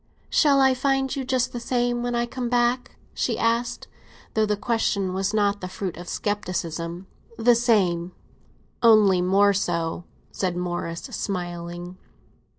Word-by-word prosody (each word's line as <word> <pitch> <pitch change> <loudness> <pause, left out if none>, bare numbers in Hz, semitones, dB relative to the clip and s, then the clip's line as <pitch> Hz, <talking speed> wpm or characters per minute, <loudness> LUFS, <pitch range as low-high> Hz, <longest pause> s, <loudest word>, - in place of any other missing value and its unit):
"Shall 285 -3 +4
I 265 -1 +5
find 270 +1 0
you 275 - -2
just 255 -1 0
the 240 - -3
same 240 0 0
when 245 0 -2
I 235 0 +1
come 245 0 -4
back?" 245 +1 +1 0.2
she - - -1
asked; 235 +1 0 0.5
though 220 -1 +2
the 210 0 0
question 200 -4 0
was 195 +1 -1
not 205 -1 +1
the 185 - -4
fruit 185 -1 -5
of 175 +1 -9
scepticism. 175 -4 -3 0.3
"The 240 +2 +5
same—only 205 -1 +1
more 200 +3 +4
so!" 170 -3 -2 0.3
said 180 -2 -2
Morris, 175 -1 -3
smiling. 175 -1 -5
205 Hz, 140 wpm, -24 LUFS, 180-240 Hz, 0.5 s, I